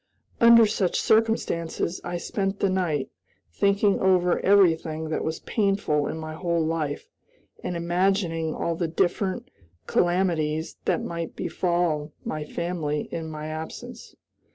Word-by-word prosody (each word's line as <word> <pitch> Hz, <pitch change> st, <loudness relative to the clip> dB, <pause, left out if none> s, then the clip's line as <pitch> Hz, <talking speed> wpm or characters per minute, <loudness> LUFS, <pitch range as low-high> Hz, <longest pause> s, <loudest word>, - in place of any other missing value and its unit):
Under 235 Hz, -1 st, +8 dB
such 205 Hz, -4 st, 0 dB
circumstances 200 Hz, -7 st, +1 dB
I 175 Hz, 0 st, -3 dB
spent 195 Hz, +1 st, -2 dB
the 195 Hz, -, +2 dB
night, 170 Hz, -7 st, -1 dB, 0.4 s
thinking 200 Hz, -, +2 dB
over 180 Hz, -2 st, +3 dB
everything 160 Hz, -5 st, +3 dB
that 155 Hz, -, -1 dB
was 160 Hz, 0 st, -3 dB
painful 195 Hz, -8 st, 0 dB
in -, -, -4 dB
my 155 Hz, 0 st, -6 dB
whole 170 Hz, 0 st, 0 dB
life, 155 Hz, -3 st, -2 dB, 0.6 s
and 175 Hz, -, -2 dB
imagining 170 Hz, -2 st, 0 dB
all 170 Hz, -, -1 dB
the 165 Hz, 0 st, -1 dB
different 190 Hz, +8 st, -1 dB, 0.3 s
calamities 170 Hz, -3 st, 0 dB
that -, -, +1 dB
might 170 Hz, -1 st, -5 dB
befall 170 Hz, -4 st, -1 dB
my 155 Hz, -1 st, -3 dB
family 155 Hz, -2 st, -3 dB
in 160 Hz, -1 st, -4 dB
my 155 Hz, -1 st, -6 dB
absence. 155 Hz, +1 st, -7 dB
170 Hz, 130 wpm, -25 LUFS, 160-190 Hz, 0.6 s, Under